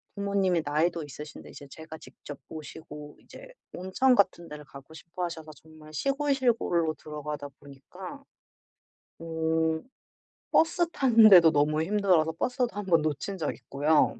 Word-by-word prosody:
부모님이 200 -3 +1
나이도 160 +3 0
있으신데 150 +1 -10
이제 140 - -12
제가 160 +2 -10
직접 145 - -11
모시고 150 -1 -10
이제 - - -13 0.3
온천 190 +9 +2
같은 175 -4 +1
데를 150 -1 -9
가고 140 +2 -14
싶어하셔서 165 -1 -6
정말 155 +1 -16
시골, 275 - 0
시골로 220 - +1
들어가다 150 -1 -7
보니까 185 - -11 1.0
어 160 -1 -1 0.7
버스 335 +1 +3
타는데도 215 - +7
너무 150 +1 +1
힘들어서 180 -4 +2
버스도 250 +8 -1
1 205 0 -5
번 165 -3 +4
놓친 155 +6 -3
적 155 - -2
있고요. 150 +3 +1
160 Hz, 305 characters per minute, -28 LUFS, 150-200 Hz, 1.0 s, 타는데도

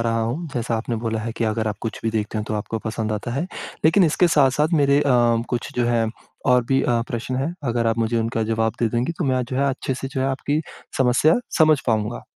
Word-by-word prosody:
रहा 115 0 0
हूँ 130 +10 -2
जैसा 115 -1 -1
आपने 115 +1 -3
बोला 110 -1 -1
है 115 +1 -4
कि 115 - 0
अगर 110 0 0
आप 105 -1 -4
कुछ 115 - -5
भी 115 - 0
देखते 110 0 -2
हो 105 - -2
तो 110 - -1
आपको 110 +2 -3
पसंद 110 0 -3
आता 105 +3 -3
है। 150 +7 -1 0.4
लेकिन 175 +4 +5
इसके 170 +3 +3
साथ-साथ 145 0 +3
मेरे 140 0 +4
अ, - - +2 0.5
कुछ 120 -2 -3
जो 120 - +2
है 115 -1 +2 0.4
और 125 -2 +4
भी 135 +2 +2
अ, 120 -1 +1
प्रश्न 120 +2 -3
हैं 145 +7 -2
अगर 115 0 0
आप 115 0 +1
मुझे 115 +1 0
उनका 115 0 -1
जवाब 110 0 +1
दे 115 - +3
देंगी 120 +8 -1
तो 170 - 0
मैं 130 -1 +1
जो 130 +2 -5
है 140 +1 +2
अच्छे-से 135 0 -3
जो 135 -1 -4
है 135 - +1
आपकी 140 +3 -1 0.4
समस्या 130 +5 +4 0.2
समझ 155 -3 +5
पाऊँगा। 110 0 0
120 Hz, 240 wpm, -22 LUFS, 115-135 Hz, 0.5 s, लेकिन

